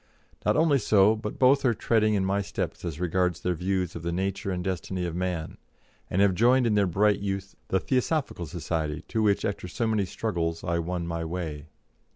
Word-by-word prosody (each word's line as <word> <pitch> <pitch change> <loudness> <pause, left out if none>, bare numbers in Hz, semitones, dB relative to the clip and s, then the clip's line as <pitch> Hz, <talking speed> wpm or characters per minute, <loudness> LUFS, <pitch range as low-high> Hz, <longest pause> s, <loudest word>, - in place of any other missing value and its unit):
Not - - +2
only 155 -3 +4
so, 105 -1 +4
but 105 -1 -6
both 135 +2 +4
are 120 -4 +3
treading 110 -1 +2
in 95 -2 +1
my 100 +1 +1
steps 100 - -4
as 85 -3 -4
regards 90 0 0
their 90 - 0
views 90 0 -1
of 85 - -5
the 85 0 -2
nature 95 +3 -2
and 90 -1 -2
destiny 90 0 -3
of 85 - -3
man, 90 -3 -3 0.5
and 95 +3 +3
have 100 -2 +4
joined 125 +6 +4
in 115 - +2
their 100 -2 +3
bright 100 +4 +2
youth 100 -1 -3
the 95 - +1
Theosophical 130 - -1
Society 80 +1 -3
to 110 - 0
which, 105 -2 +2
after 100 -3 -3
so 115 +6 -2
many 110 -3 +1
struggles, 85 -5 -2
I 85 -1 0
won 85 +1 -3
my 85 -1 -3
way. 80 -3 -5
95 Hz, 200 wpm, -27 LUFS, 85-105 Hz, 0.5 s, only